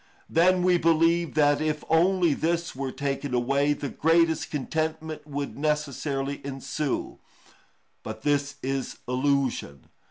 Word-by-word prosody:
Then 180 +2 +3
we 180 -1 +4
believe 165 0 +2
that 145 -1 +3
if 155 -1 -1
only 175 0 +3
this 170 +1 -1
were 135 0 -3
taken 140 -1 -2
away, 140 +4 +2
the 145 -1 -5
greatest 165 +2 +2
contentment 155 +1 -3
would 140 -1 -5
necessarily 140 -2 -1
ensue. 140 +1 -3 0.8
But 110 0 -7
this 145 -1 +1
is 135 0 -3
illusion. 130 - -1
145 Hz, 120 wpm, -26 LUFS, 140-160 Hz, 0.8 s, we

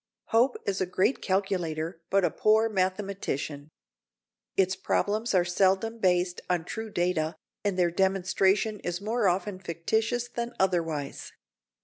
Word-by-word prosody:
Hope 245 +3 +3
is 195 -1 -1
a 185 - +1
great 185 +8 +1
calculator, 175 -4 -1
but 195 -2 +3
a 165 - +1
poor 220 +1 +3
mathematician. 185 -7 -2 0.9
Its 190 0 +3
problems 210 +3 0
are 175 -1 +4
seldom 195 +5 +1
based 180 -2 +1
on 175 -2 0
true 220 +4 -5
data, 175 -4 0 0.3
and 200 -3 0
their 175 -2 +3
demonstration 195 +3 +2
is 175 -1 -3
more 215 +1 0
often 185 +2 0
fictitious 220 +8 -1
than 240 0 -5
otherwise. 165 -6 -1
190 Hz, 130 wpm, -28 LUFS, 175-210 Hz, 0.9 s, are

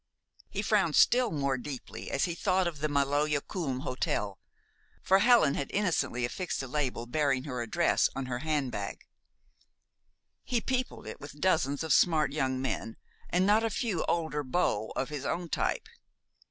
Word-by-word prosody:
He - - -3
frowned - - +2
still 245 -1 +5
more 140 -5 -1
deeply 135 0 -7
as 140 - +1
he 175 - -2
thought 185 +1 +1
of 165 -4 -3
the 155 +1 -1
Maloja 145 +1 +2
Kulm 140 -6 -4
Hotel, 105 -6 -2 0.6
for 190 +1 +5
Helen 230 - +5
had 140 - -3
innocently 175 - 0
affixed 175 +3 -3
a - - -5
label 130 -3 -2
bearing 135 0 +1
her 125 -4 -4
address 115 - +2
on 135 - -3
her 125 -1 -3
handbag. 135 -9 -2 1.4
He 245 - 0
peopled 255 +2 -2
it - - -8
with 145 +1 -10
dozens 155 -5 +1
of 160 - +2
smart 155 -5 +4
young 130 -3 0
men 130 -3 -3 0.3
and 180 +2 +2
not 210 +3 +4
a 225 - +1
few 210 -4 -1
older 160 -3 0
beaux 130 -7 0
of 130 - -2
his 145 -2 -5
own 170 +4 -2
type. 460 - -1
150 Hz, 165 wpm, -30 LUFS, 130-180 Hz, 1.4 s, still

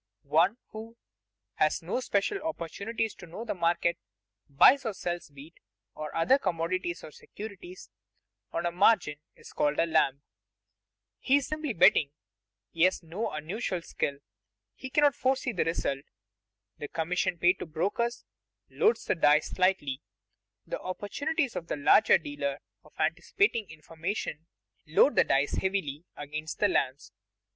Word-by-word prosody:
One 165 - +3
who, 225 +2 -9 0.6
having 155 - +3
no 200 - 0
special 250 - 0
opportunities 225 - -3
to 175 - -13
know 195 +8 -7
the - - -2
market, 170 -1 +1 0.5
buys 255 - +6
or 220 -4 -3
sells 175 -2 -4
wheat, 145 +3 -14 0.3
or 155 -1 -7
other 255 +12 +4
commodities 175 -2 -2
or - - -9
securities, 220 - -10 0.6
on 170 +1 -2
margin, 180 -6 +3 0.2
is - - -14
called 145 0 +1
a - - +3
lamb. 140 -3 +1 1.0
He 270 - +3
is 285 - -1
simply 310 -4 -3
betting. 160 -5 +5 0.6
He 165 - -5
has 185 -1 +1
no 180 +8 -3
unusual 175 +4 -4
skill; 140 -3 -2 0.6
he 260 - -8
cannot 290 +1 +4
foresee 260 0 0
the 190 - 0
result. 140 -4 -1 0.8
The 145 - -5
commission 175 +2 -1
paid 175 +3 +3
to - - -6
brokers 200 +9 -2 0.5
"loads 445 +1 +2
the - - +2
dice" 150 -3 +3
slightly; 180 -8 +1 0.6
the - - -4
opportunities 275 - -2
of 165 - -5
the - - -3
larger 145 +9 +5
dealer 145 -3 -4 0.3
of - - -20
anticipating 235 - +1
information 160 +1 -5 0.4
load 165 - +4
the - - +6
dice 140 +1 +1
heavily 175 -6 -2
against 150 +2 -5
the 205 - +3
lambs. 135 -5 -1
175 Hz, 140 wpm, -29 LUFS, 155-225 Hz, 1.0 s, buys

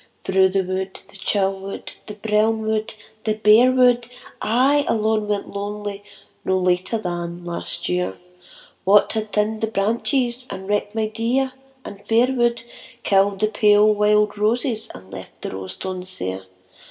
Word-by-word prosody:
Through 190 0 +3
the 190 0 +1
wood, 190 +1 -3
the - - -16
chill 195 0 0
wood, 195 +1 -7 0.2
the 210 - -7
brown 220 +1 +1
wood, 215 0 -2 0.3
the 215 -1 0
bare 215 +4 +6
wood, 245 -2 +4 0.3
I 270 +6 +3
alone 215 -1 +1
went 205 -1 -2
lonely 205 0 -5 0.4
no 190 - +1
later 185 +4 +1
than 175 -3 -5
last 170 -1 -2
year, 180 0 -1 0.7
What 200 +2 +5
had 215 -1 -3
thinned 215 +1 0
the 225 - +1
branches, 235 +4 0
and 190 0 -7
wrecked 205 +1 -1
my 220 -1 +1
dear 235 +5 0 0.3
and 200 0 -9
fair 240 +3 +3
wood, 240 -2 +1 0.4
Killed 195 0 +2
the 215 - +4
pale 210 0 +5
wild 210 0 +2
roses 225 +1 0
and 95 0 -13
left 95 -1 -10
the - - -4
rose 95 0 -6
thorns 185 -1 -5
sere 95 - -5
210 Hz, 155 wpm, -22 LUFS, 190-225 Hz, 0.7 s, bare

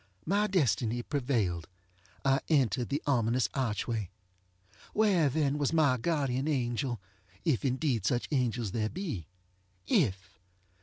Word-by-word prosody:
My 205 +4 +2
destiny 120 - +1
prevailed. 115 - -1 0.6
I 135 0 +4
entered 130 -5 +2
the 145 +3 -1
ominous 120 -4 +2
archway. 115 -5 -1 0.8
Where 195 -8 +3
then 145 0 0
was 145 +2 +1
my 145 -6 +4
guardian 140 -1 0
angel? 125 -3 -1 0.5
ŌĆöif 145 -8 +2
indeed 130 - 0
such 120 -1 0
angels 120 -6 0
there 110 0 -1
be. 155 - -5 0.6
If! 95 -1 0
130 Hz, 115 wpm, -30 LUFS, 115-150 Hz, 0.8 s, I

